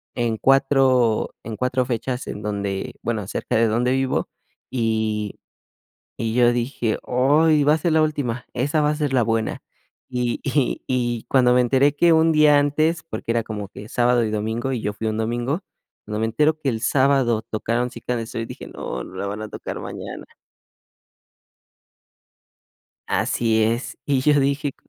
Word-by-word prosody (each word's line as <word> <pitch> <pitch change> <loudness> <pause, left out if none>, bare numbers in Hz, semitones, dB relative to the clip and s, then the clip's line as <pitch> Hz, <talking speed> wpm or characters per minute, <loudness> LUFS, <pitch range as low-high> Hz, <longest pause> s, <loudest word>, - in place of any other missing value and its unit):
en 115 -2 0
4, 135 -3 +3
en 110 0 -6
4 125 +2 0
fechas 125 +1 -3
en 105 - -6
donde, 100 -2 -3
bueno, 110 -3 -2
cerca - - -3
de 115 0 +4
donde 120 +3 +1
vivo, 130 0 0 0.4
y 110 -3 -1 0.8
y 115 -1 -2
yo 120 0 +5
dije: 120 -2 -1
"Ay, 145 +5 +3
va 150 +2 +5
a - - 0
ser 165 +1 0
la 160 0 +4
última, 130 -6 -2
esa 145 +5 0
va 150 - +3
a - - 0
ser 150 -3 -1
la 130 -2 +3
buena". 115 0 -1 0.5
Y 125 -1 -1
y 135 -3 0
y 120 -3 -1
cuando 125 -2 +4
me 125 - +5
enteré 135 +4 +3
que 170 +3 +4
1 160 0 +4
día 150 -1 +6
antes, 155 +3 +1
porque 110 +1 -5
era 115 0 +1
como 105 -2 -5
que 105 +2 -11
sábado 120 0 +2
y 110 - -2
domingo, 110 +5 -2
y 125 - -2
yo 105 - -2
fui 110 +2 -5
un 110 -1 -1
domingo, 120 +8 -1 0.4
cuando 105 0 -4
me 110 - +1
entero 150 +7 +1
que 145 - -2
el 115 -4 -1
sábado 130 -3 +2
tocaron: 120 +3 -1
"Cita 125 -1 -4
de 115 -1 -3
Sol", 115 0 -5
dije: - - -9
"No, - - -5
no - - -12
la 100 - -3
van 105 +2 -5
a 110 - -6
tocar - - -6
mañana". - - -7 2.8
Así 110 -2 +1
es, 115 +3 -1
y 140 -2 +2
yo 145 0 +4
dije 140 0 0
125 Hz, 175 wpm, -22 LUFS, 110-140 Hz, 2.8 s, día